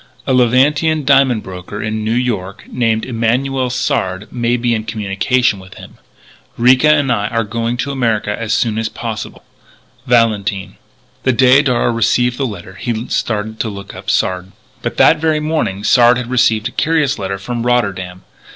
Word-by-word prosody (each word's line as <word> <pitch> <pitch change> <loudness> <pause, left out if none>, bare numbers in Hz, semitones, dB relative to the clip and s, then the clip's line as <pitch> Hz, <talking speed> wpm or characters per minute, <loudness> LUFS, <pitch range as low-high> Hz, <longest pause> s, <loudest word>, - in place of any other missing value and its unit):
"A - - 0
Levantine 140 +5 +2
diamond 135 -5 +3
broker 95 +2 -8
in 110 0 -3
New 110 +2 0
York, 105 -6 -2
named 115 -3 0
Emanuel 125 +2 0
Sard, 95 -5 -2
may 120 0 0
be 120 0 0
in 110 -1 -2
communication 105 +2 0
with 95 0 -14
him. - - -13 0.6
"Ricca 130 +5 +4
and 145 -4 +2
I 105 -3 0
are 115 +1 -1
going 115 +2 -3
to 140 +3 -2
America 115 -6 -1
as 115 -1 -4
soon 110 -2 +1
as 115 0 -2
possible. 115 -3 -6 0.6
"VALENTINE." 105 -5 +1 0.4
The 130 - +1
day 130 +3 +5
Darragh 125 -3 +1
received 125 +3 +1
the 135 - 0
letter 95 -4 -9
he 120 -1 -3
started 110 0 -2
to 110 - -1
look 100 -1 -9
up - - -8
Sard. 90 +1 -1 0.3
But 120 - -4
that 160 - +5
very 155 0 +1
morning 150 -11 -2
Sard 120 +2 +5
had 125 0 -5
received 115 -3 +2
a - - -7
curious 150 -2 0
letter 100 0 -3
from 115 +4 -4
Rotterdam. 95 -7 -1
115 Hz, 170 wpm, -16 LUFS, 105-125 Hz, 0.6 s, day